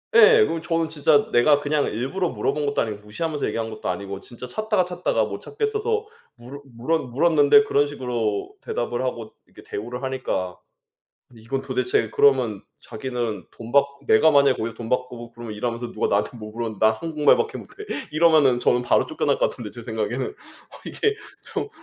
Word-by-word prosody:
예. 445 0 +8
그럼 165 - -1
저는 165 -2 0
진짜 145 -1 +3
내가 145 +5 +5
그냥 145 0 0
일부러 140 - -2
물어본 150 -1 -1
것도 140 - 0
아니고 105 -2 -2
무시하면서 150 +7 -3
얘기한 115 0 -2
것도 110 -4 -5
아니고 100 +1 -4
진짜 125 +1 -10
찾다가 215 -3 0
찾다가 180 0 0
못 - - -6
찾겠어서 435 +1 -2 0.3
물어 130 +4 -11
물어 130 +6 -1
물었는데 150 - +4
그런 145 -7 +2
식으로 120 -7 -3
대답을 120 +1 -3
하고 115 -3 -4
이렇게 - - -16
대우를 120 +5 -6
하니까. 130 -9 -3 0.7
근데 115 -3 -17
이건 135 +4 -2
도대체 125 -4 0
그러면 125 -8 +3
자기는 120 -1 -5
돈 115 0 -10
받고 140 0 +1
내가 155 +9 +5
만약 140 -2 +5
거기서 115 0 -4
돈 115 0 -7
받고 125 -2 -3
그러면 120 -2 -8
일하면서 120 +2 -3
누가 110 - 0
나한테 105 +4 0
뭐 110 0 -8
물어봤는데 110 -2 -3
"난 110 0 +5
한국말밖에 165 - +2
못해." 420 - -10 0.3
이러면 155 -5 +4
저는 120 0 +2
바로 120 - +2
쫓겨날 - - 0
것 - - +2
같은데 110 -4 -8
제 120 - -10
생각에는. 115 +3 -2
어 - - -6 0.5
'이게 430 -1 0 0.4
좀 - - -2
130 Hz, 410 characters per minute, -23 LUFS, 115-155 Hz, 0.7 s, 예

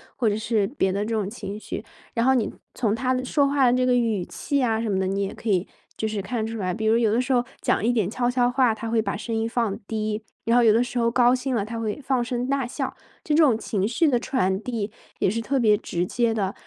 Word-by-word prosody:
或 230 -4 +1
者 205 - 0
是 220 -2 +1
别 195 -8 0
的 200 +2 -1
这 225 +1 -3
种 205 -3 -1
情 205 -2 -6
绪。 215 - -6 0.3
然 230 +1 +1
后 265 - +5
你 230 - 0 0.2
从 220 -4 +1
他 255 +2 0
的 255 - -2
说 280 +1 +2
话 280 -2 +3
的 - - +3
这 255 - +2
个 250 -1 +3
语 225 -6 +1
气 285 - -3
呀 225 -3 +1
什 225 - -2
么 190 -1 +1
的， 190 - 0
你 195 +1 -1
也 195 - -3
可 230 - -10
以 185 -1 +2 0.3
就 220 - -2
是 210 -2 -2
看 220 +3 -2
出 225 0 -5
来。 185 -3 -1
比 220 +2 -3
如 225 +1 +4
有 225 -3 +3
的 240 - +3
时 265 - -3
候 245 -1 +3 0.2
讲 - - +1
一 240 - +3
点 210 -5 +1
悄 245 +1 0
悄 245 -1 +2
话， 245 -3 +3
他 225 0 -5
会 225 -1 +2
把 - - -2
声 230 - -5
音 225 0 0
放 230 -3 -1
低。 215 0 -2 0.2
然 235 +1 +3
后 240 - +5
有 220 -2 +6
的 235 +2 +3
时 245 0 -3
候 230 0 +3
高 245 +1 +4
兴 255 0 -1
了， 205 - +1
他 230 +2 -5
会 220 +5 -3
放 260 -2 +1
声 245 0 -2
大 275 -3 0
笑。 255 - -3 0.3
这 300 - -1
种 295 -8 +5
情 205 -3 -1
绪 280 +7 +2
的 245 -3 +2
传 190 -7 0
递 220 -4 -3 0.3
也 - - +3
是 230 +3 -1
特 270 +4 -1
别 210 -3 +4
直 175 -2 -2
接 235 +3 +1
的， 200 -3 -1
230 Hz, 300 characters per minute, -24 LUFS, 210-245 Hz, 0.3 s, 有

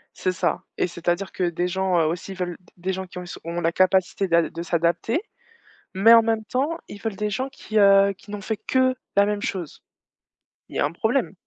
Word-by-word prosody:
C'est 185 - 0
ça 180 - -1
et - - +1
c'est-à-dire 175 +2 -2
que 185 - -3
des 175 0 0
gens, 185 -1 +1
heu, 160 - +3
aussi 170 +5 -3
ils 190 - -8
veulent 175 -2 -3
d 180 - -26
des 185 +2 -2
gens 190 0 -4
qui 180 - -12
ont - - -6
s 175 - -8
ont 170 +1 -3
la 165 0 +2
capacité 185 +1 +2
d'ad 170 -1 +2
de 170 - -6
s'adapter. 170 - 0 0.7
Mais 205 +4 +6
en 230 - +9
même 225 -1 0
temps, 280 +8 -1
ils 205 - -10
veulent 220 -3 -3
des 210 0 -2
gens 255 +7 -2
qui, 220 -5 -5
heu, 200 0 +6
qui 200 +2 -20
n'ont 205 -1 -5
fait 220 +2 -3
que 260 +4 +2 0.2
la 200 0 +5
même 205 0 -1
chose. 185 - -5 0.9
Il - - -11
y - - -1
a - - +3
un 145 - -2
problème. 220 +8 0
190 Hz, 235 wpm, -24 LUFS, 175-215 Hz, 0.9 s, en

